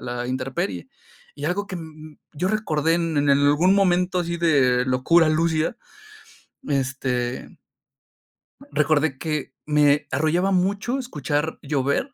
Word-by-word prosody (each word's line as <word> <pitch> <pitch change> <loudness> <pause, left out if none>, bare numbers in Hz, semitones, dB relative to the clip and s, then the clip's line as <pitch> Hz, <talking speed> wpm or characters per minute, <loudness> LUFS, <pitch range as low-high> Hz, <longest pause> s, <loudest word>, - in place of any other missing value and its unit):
la 120 0 -4
intemperie. 130 - -3 0.5
Y - - -7
algo 200 +3 -1
que, 185 - -5
mm, 155 -2 -11
yo 180 +4 -2
recordé 165 -7 0
en 165 -2 -1
en 145 0 +2
algún 145 +7 +4
momento 180 -2 +2
así 170 -1 -2
de 130 -7 +3
locura, 155 +6 +3
lúcida, 160 +6 0 0.9
este 130 -2 -2 1.2
recordé 150 -1 +1
que 155 -2 -4
me 150 -1 +3
arrollaba 160 +7 +1
mucho 200 +7 0
escuchar 150 - -3
llover, 140 - -1
155 Hz, 120 wpm, -23 LUFS, 140-175 Hz, 1.2 s, algún